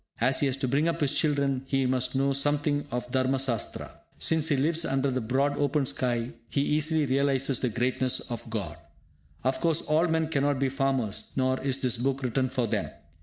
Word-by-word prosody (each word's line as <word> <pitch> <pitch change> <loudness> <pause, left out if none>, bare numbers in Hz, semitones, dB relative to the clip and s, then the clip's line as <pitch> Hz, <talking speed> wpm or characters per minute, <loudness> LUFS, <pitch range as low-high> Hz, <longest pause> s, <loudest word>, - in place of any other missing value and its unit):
As 125 +3 +3
he 145 - +2
has 135 -1 0
to 135 -1 -1
bring 140 +5 +1
up 170 0 -1
his 145 -1 +1
children, 140 -4 +1
he 135 -1 +1
must 130 0 0
know 135 +1 +2
something 145 +1 0
of 125 0 -4
Dharma 130 +1 +1
Sastra. 130 -5 -3 0.2
Since 160 -1 +2
he 150 - +2
lives 160 +4 +1
under 135 -2 0
the 130 0 -1
broad 135 +5 +1
open 145 0 +1
sky, 120 -2 -1 0.2
he 140 - 0
easily 155 +1 +1
realises 135 0 +1
the 125 - 0
greatness 125 +2 0
of 120 -1 -7
God. 95 -8 -4 0.7
Of 130 +1 0
course, 165 -1 +2
all 160 +2 +2
men 160 -1 0
cannot 145 -2 +1
be 135 0 +1
farmers, 130 -6 -1
nor 130 0 +1
is 135 0 -1
this 125 -2 +1
book 135 +2 -1
written 130 +1 0
for 125 -1 -1
them. 110 - -2
135 Hz, 200 wpm, -27 LUFS, 130-145 Hz, 0.7 s, As